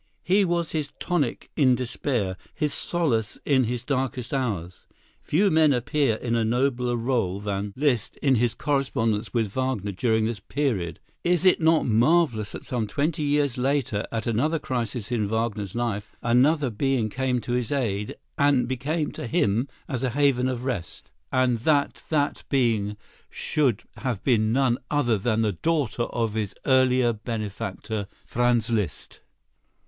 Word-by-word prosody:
He 195 Hz, +3 st, +3 dB
was 170 Hz, -2 st, 0 dB
his 150 Hz, -2 st, -2 dB
tonic 155 Hz, -9 st, -1 dB
in 130 Hz, -4 st, +4 dB
despair, 120 Hz, -5 st, -1 dB, 0.2 s
his 150 Hz, -3 st, -1 dB
solace 125 Hz, -12 st, -1 dB
in 130 Hz, -3 st, +3 dB
his 120 Hz, +1 st, -3 dB
darkest 130 Hz, -2 st, -2 dB
hours. 100 Hz, -10 st, -3 dB, 0.3 s
Few 195 Hz, +6 st, +2 dB
men 155 Hz, -2 st, +5 dB
appear 130 Hz, 0 st, +1 dB
in 120 Hz, +1 st, -2 dB
a 115 Hz, -, +2 dB
nobler 125 Hz, +1 st, +1 dB
rôle 115 Hz, -6 st, -1 dB
than 100 Hz, 0 st, -2 dB
Liszt 130 Hz, -6 st, 0 dB
in 135 Hz, -2 st, +2 dB
his 120 Hz, -1 st, +2 dB
correspondence 130 Hz, -7 st, 0 dB
with 115 Hz, -5 st, 0 dB
Wagner 130 Hz, -6 st, -1 dB
during 110 Hz, +3 st, +1 dB
this 115 Hz, -2 st, -2 dB
period. 100 Hz, -, -2 dB, 0.2 s
Is 175 Hz, +1 st, +2 dB
it 185 Hz, -, +5 dB
not 160 Hz, 0 st, +4 dB
marvellous 120 Hz, -1 st, +2 dB
that -, -, -8 dB
some 120 Hz, -4 st, -2 dB
twenty 150 Hz, +8 st, -1 dB
years 145 Hz, -3 st, +1 dB
later, 130 Hz, -5 st, 0 dB
at 115 Hz, -1 st, -2 dB
another 130 Hz, +8 st, +1 dB
crisis 120 Hz, -5 st, -3 dB
in 110 Hz, -4 st, 0 dB
Wagner's 110 Hz, -3 st, -2 dB
life, 110 Hz, -4 st, -2 dB
another 130 Hz, +3 st, +3 dB
being 120 Hz, +1 st, 0 dB
came 125 Hz, +2 st, -1 dB
to 120 Hz, -, -5 dB
his 120 Hz, -2 st, -1 dB
aid 105 Hz, -7 st, -1 dB, 0.2 s
and 140 Hz, -4 st, +3 dB
became 145 Hz, +5 st, -1 dB
to -, -, -6 dB
him 110 Hz, +3 st, +1 dB, 0.2 s
as 130 Hz, -6 st, -2 dB
a 130 Hz, -, +1 dB
haven 130 Hz, -1 st, +2 dB
of 125 Hz, -1 st, -3 dB
rest; 115 Hz, -11 st, -4 dB, 0.2 s
and 130 Hz, -2 st, +2 dB
that 145 Hz, +3 st, +1 dB
that 145 Hz, -2 st, 0 dB
being 110 Hz, -6 st, +1 dB, 0.3 s
should 130 Hz, -8 st, 0 dB
have 125 Hz, -7 st, -3 dB
been 110 Hz, -4 st, +3 dB
none 130 Hz, -1 st, +2 dB
other 120 Hz, -8 st, +2 dB
than 110 Hz, +2 st, +1 dB
the 105 Hz, -, +2 dB
daughter 140 Hz, -, 0 dB
of 115 Hz, -3 st, -2 dB
his 105 Hz, -3 st, -3 dB
earlier 130 Hz, -2 st, +4 dB
benefactor, 110 Hz, -1 st, -4 dB, 0.2 s
Franz 120 Hz, -1 st, +1 dB
Liszt? 105 Hz, -6 st, -2 dB
125 Hz, 155 wpm, -25 LUFS, 110-140 Hz, 0.3 s, men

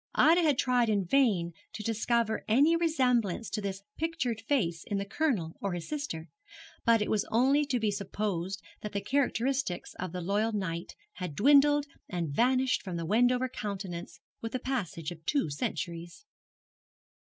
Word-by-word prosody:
Ida 335 Hz, +3 st, +6 dB
had 300 Hz, -5 st, +3 dB
tried 245 Hz, -3 st, +2 dB
in 200 Hz, -3 st, +1 dB
vain 190 Hz, -8 st, +2 dB, 0.2 s
to 215 Hz, -, -6 dB
discover 225 Hz, 0 st, 0 dB
any 280 Hz, +9 st, +5 dB
resemblance 250 Hz, -, +1 dB
to 210 Hz, -, -2 dB
this 195 Hz, -1 st, -4 dB
pictured 295 Hz, -9 st, -1 dB
face 185 Hz, -, 0 dB
in 205 Hz, -, -2 dB
the 200 Hz, -, -2 dB
Colonel 205 Hz, -, -1 dB
or 200 Hz, -2 st, -1 dB
his 175 Hz, -2 st, -5 dB
sister; 285 Hz, -, -4 dB, 0.6 s
but 230 Hz, -2 st, +4 dB
it -, -, -4 dB
was 210 Hz, -1 st, +2 dB
only 270 Hz, +6 st, +3 dB
to 255 Hz, -4 st, 0 dB
be 215 Hz, -2 st, +1 dB
supposed 195 Hz, -2 st, -3 dB, 0.2 s
that 210 Hz, -, -6 dB
the 200 Hz, -, 0 dB
characteristics 265 Hz, -3 st, 0 dB
of 185 Hz, -2 st, -3 dB
the 180 Hz, +1 st, -4 dB
loyal 205 Hz, +5 st, 0 dB
knight 175 Hz, -5 st, -3 dB, 0.2 s
had 180 Hz, -6 st, -5 dB
dwindled 290 Hz, -, +5 dB, 0.2 s
and 170 Hz, -4 st, -2 dB
vanished 255 Hz, -, +2 dB
from 185 Hz, -3 st, -5 dB
the 165 Hz, -, -3 dB
Wendover 245 Hz, +6 st, +3 dB
countenance 195 Hz, -8 st, -6 dB, 0.2 s
with 225 Hz, 0 st, -5 dB
the 255 Hz, -, -1 dB
passage 200 Hz, -, -3 dB
of 165 Hz, -2 st, -10 dB
two 275 Hz, -, +1 dB
centuries. 170 Hz, -, -4 dB
215 Hz, 165 wpm, -30 LUFS, 180-260 Hz, 0.6 s, Ida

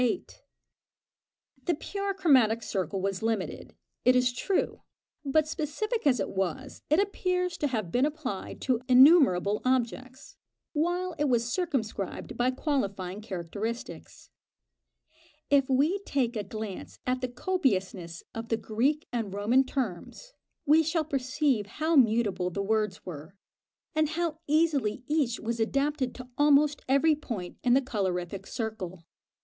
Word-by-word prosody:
The 345 Hz, -, +1 dB
pure 395 Hz, +1 st, -3 dB
chromatic 250 Hz, -, +4 dB
circle 195 Hz, -2 st, -2 dB
was 195 Hz, -1 st, -1 dB
limited, 220 Hz, -3 st, -3 dB, 0.3 s
it 250 Hz, +1 st, +5 dB
is 250 Hz, -1 st, +3 dB
true; 375 Hz, +10 st, -1 dB, 0.4 s
but, 300 Hz, +2 st, +2 dB
specific 315 Hz, -, -2 dB
as 250 Hz, -4 st, +4 dB
it 195 Hz, -, -2 dB
was, 195 Hz, +9 st, -3 dB
it 305 Hz, +4 st, +4 dB
appears 365 Hz, -3 st, 0 dB
to 295 Hz, -, +1 dB
have 215 Hz, -10 st, -3 dB
been 255 Hz, +8 st, +3 dB
applied 290 Hz, -10 st, -5 dB
to 250 Hz, -3 st, +1 dB
innumerable 250 Hz, -, +6 dB
objects, 255 Hz, +1 st, -2 dB, 0.4 s
while 350 Hz, +4 st, 0 dB
it 295 Hz, -, +2 dB
was 235 Hz, -1 st, +1 dB
circumscribed 235 Hz, -, -3 dB
by 245 Hz, +1 st, +2 dB
qualifying 205 Hz, -, -2 dB
characteristics. 210 Hz, +4 st, -6 dB, 1.2 s
If 275 Hz, -2 st, +4 dB
we 295 Hz, +9 st, +2 dB
take 265 Hz, -11 st, -1 dB
a 210 Hz, -, -2 dB
glance 215 Hz, -1 st, -7 dB
at 255 Hz, 0 st, 0 dB
the 255 Hz, -, -1 dB
copiousness 195 Hz, -, -1 dB
of 225 Hz, +1 st, -6 dB
the 225 Hz, -, +1 dB
Greek 260 Hz, +9 st, 0 dB
and 225 Hz, -5 st, -2 dB
Roman 215 Hz, +7 st, +3 dB
terms, 260 Hz, -, -5 dB, 0.3 s
we 305 Hz, +2 st, +6 dB
shall 320 Hz, 0 st, 0 dB
perceive 275 Hz, -5 st, 0 dB
how 315 Hz, +2 st, +1 dB
mutable 215 Hz, -, +3 dB
the 200 Hz, +3 st, -3 dB
words 210 Hz, -1 st, -1 dB
were, 160 Hz, +1 st, -8 dB, 0.6 s
and 310 Hz, -1 st, +2 dB
how 320 Hz, -1 st, -2 dB
easily 290 Hz, -7 st, +1 dB
each 290 Hz, -6 st, 0 dB
was 230 Hz, +1 st, -3 dB
adapted 275 Hz, +3 st, 0 dB
to 255 Hz, -1 st, -9 dB
almost 295 Hz, 0 st, +4 dB
every 280 Hz, +4 st, +4 dB
point 220 Hz, -12 st, -6 dB
in 245 Hz, -1 st, +4 dB
the 275 Hz, -, +4 dB
colorific 195 Hz, -5 st, -3 dB
circle. 215 Hz, -7 st, -5 dB
255 Hz, 135 wpm, -28 LUFS, 210-300 Hz, 1.2 s, innumerable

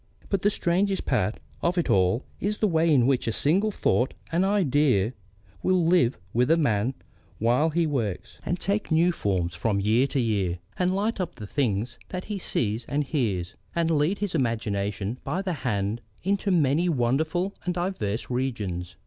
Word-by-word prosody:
But 195 Hz, -2 st, 0 dB
the 205 Hz, -, +4 dB
strangest 195 Hz, 0 st, 0 dB
part 95 Hz, +5 st, 0 dB, 0.2 s
of 175 Hz, +2 st, 0 dB
it 175 Hz, -, +1 dB
all 95 Hz, +6 st, +2 dB
is 210 Hz, +2 st, -1 dB
the 215 Hz, -, +2 dB
way 165 Hz, -2 st, +2 dB
in 130 Hz, -5 st, +5 dB
which 130 Hz, -3 st, +1 dB
a -, -, +2 dB
single 180 Hz, -, +3 dB
thought, 130 Hz, -10 st, +1 dB, 0.2 s
an 170 Hz, +3 st, +2 dB
idea, 145 Hz, -, +2 dB, 0.5 s
will 185 Hz, -2 st, +2 dB
live 165 Hz, -8 st, +3 dB, 0.2 s
with 125 Hz, +3 st, +2 dB
a 165 Hz, -, +5 dB
man 120 Hz, -4 st, +1 dB, 0.4 s
while 120 Hz, +8 st, +2 dB
he 165 Hz, +1 st, +1 dB
works, 115 Hz, -, -3 dB
and 175 Hz, -, -2 dB
take 200 Hz, +2 st, -1 dB
new 165 Hz, +3 st, +4 dB
forms 95 Hz, -, -1 dB
from 105 Hz, 0 st, 0 dB
year 110 Hz, +7 st, +3 dB
to 140 Hz, -, -1 dB
year, 100 Hz, -7 st, 0 dB, 0.2 s
and 180 Hz, 0 st, +1 dB
light 210 Hz, +1 st, 0 dB
up 175 Hz, -1 st, -4 dB
the 105 Hz, -, -8 dB
things 110 Hz, -2 st, -1 dB
that 185 Hz, 0 st, -5 dB
he 205 Hz, -2 st, -4 dB
sees 115 Hz, -, -1 dB
and 145 Hz, +1 st, 0 dB
hears, 105 Hz, -, -1 dB, 0.2 s
and 165 Hz, -1 st, +1 dB
lead 160 Hz, +5 st, +2 dB
his 205 Hz, -2 st, -2 dB
imagination 110 Hz, -, -1 dB
by 175 Hz, +8 st, -2 dB
the 185 Hz, -2 st, -1 dB
hand 105 Hz, -1 st, -1 dB, 0.2 s
into 200 Hz, +2 st, 0 dB
many 165 Hz, 0 st, +3 dB
wonderful 160 Hz, +8 st, 0 dB
and 180 Hz, -1 st, -2 dB
diverse 175 Hz, -, -2 dB
regions. 100 Hz, -9 st, -3 dB
140 Hz, 175 wpm, -26 LUFS, 110-180 Hz, 0.5 s, in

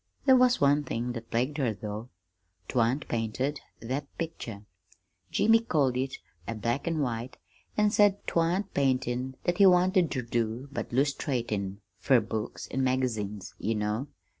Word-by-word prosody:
There 265 Hz, -2 st, +7 dB
was 250 Hz, -1 st, +4 dB
one 145 Hz, +1 st, +4 dB
thing 125 Hz, -2 st, -3 dB
that 115 Hz, -1 st, -7 dB
plagued 130 Hz, +6 st, 0 dB
her, 120 Hz, -6 st, +1 dB
though: 105 Hz, +4 st, -6 dB, 0.6 s
'twan't 125 Hz, +4 st, +1 dB
painted 120 Hz, +5 st, -1 dB, 0.2 s
that 135 Hz, +5 st, -3 dB
picture. 115 Hz, -11 st, -5 dB, 0.6 s
Jimmy 225 Hz, +2 st, +4 dB
called 145 Hz, -, +1 dB
it 130 Hz, +1 st, -1 dB, 0.3 s
a 115 Hz, -, -3 dB
'black 120 Hz, +8 st, -2 dB
an' 165 Hz, -2 st, 0 dB
white,' 120 Hz, -2 st, -3 dB, 0.4 s
an' 210 Hz, -1 st, +4 dB
said 205 Hz, -1 st, +3 dB
'twan't 175 Hz, +4 st, 0 dB
paintin' 130 Hz, -1 st, 0 dB
that 175 Hz, +2 st, 0 dB
he 200 Hz, -, +8 dB
wanted 180 Hz, -1 st, +4 dB
ter 130 Hz, -, -2 dB
do, 115 Hz, +3 st, -2 dB
but 145 Hz, -, -4 dB
'lustratin' 120 Hz, -7 st, -1 dB, 0.2 s
fer 130 Hz, +4 st, +4 dB
books 110 Hz, 0 st, -4 dB
and 135 Hz, -, 0 dB
magazines, 110 Hz, -7 st, -1 dB
you 115 Hz, -, 0 dB
know. 105 Hz, +5 st, -1 dB
130 Hz, 150 wpm, -29 LUFS, 115-150 Hz, 0.6 s, he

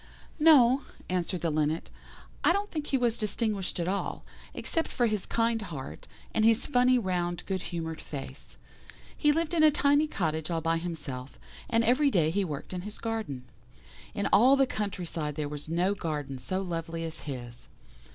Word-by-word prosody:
"No," 275 Hz, -4 st, +7 dB, 0.3 s
answered 180 Hz, -1 st, -1 dB
the 165 Hz, -, 0 dB
Linnet, 155 Hz, +2 st, 0 dB, 0.5 s
"I 345 Hz, -, +5 dB
don't 405 Hz, +2 st, -2 dB
think 305 Hz, -2 st, -3 dB
he 270 Hz, -, +2 dB
was 240 Hz, -2 st, +1 dB
distinguished 210 Hz, -3 st, -1 dB
at 170 Hz, -, -1 dB
all, 200 Hz, +2 st, -2 dB, 0.3 s
except 330 Hz, -, -1 dB
for 245 Hz, -, +1 dB
his 215 Hz, -4 st, -1 dB
kind 230 Hz, -1 st, +1 dB
heart, 155 Hz, -10 st, -7 dB, 0.3 s
and 215 Hz, -, +2 dB
his 225 Hz, 0 st, +4 dB
funny 250 Hz, -1 st, +4 dB
round 180 Hz, -5 st, -1 dB
good 190 Hz, -2 st, -2 dB
humoured 160 Hz, -2 st, -4 dB
face. 135 Hz, -1 st, -8 dB, 0.6 s
He 295 Hz, -, +3 dB
lived 325 Hz, +2 st, 0 dB
in 330 Hz, -, +3 dB
a 310 Hz, -, +8 dB
tiny 290 Hz, +1 st, +3 dB
cottage 160 Hz, -, -2 dB
all 165 Hz, -1 st, 0 dB
by 165 Hz, +1 st, +1 dB
himself, 145 Hz, -6 st, -6 dB, 0.3 s
and 230 Hz, 0 st, +3 dB
every 255 Hz, +5 st, +4 dB
day 165 Hz, -, +2 dB
he 200 Hz, +3 st, +1 dB
worked 150 Hz, -1 st, -5 dB
in 180 Hz, -, -3 dB
his 210 Hz, +3 st, -7 dB
garden. 220 Hz, -, -3 dB, 0.7 s
In 200 Hz, -, -1 dB
all 250 Hz, +7 st, +7 dB
the 275 Hz, -1 st, +4 dB
country 205 Hz, -6 st, -3 dB
side 150 Hz, -3 st, -3 dB
there 150 Hz, -1 st, -2 dB
was 150 Hz, +1 st, -7 dB
no 175 Hz, +4 st, +2 dB
garden 150 Hz, -8 st, -4 dB
so 185 Hz, +9 st, -2 dB
lovely 165 Hz, -2 st, -4 dB
as 160 Hz, -1 st, -5 dB
his. 120 Hz, -3 st, -6 dB
185 Hz, 180 wpm, -29 LUFS, 160-235 Hz, 0.7 s, a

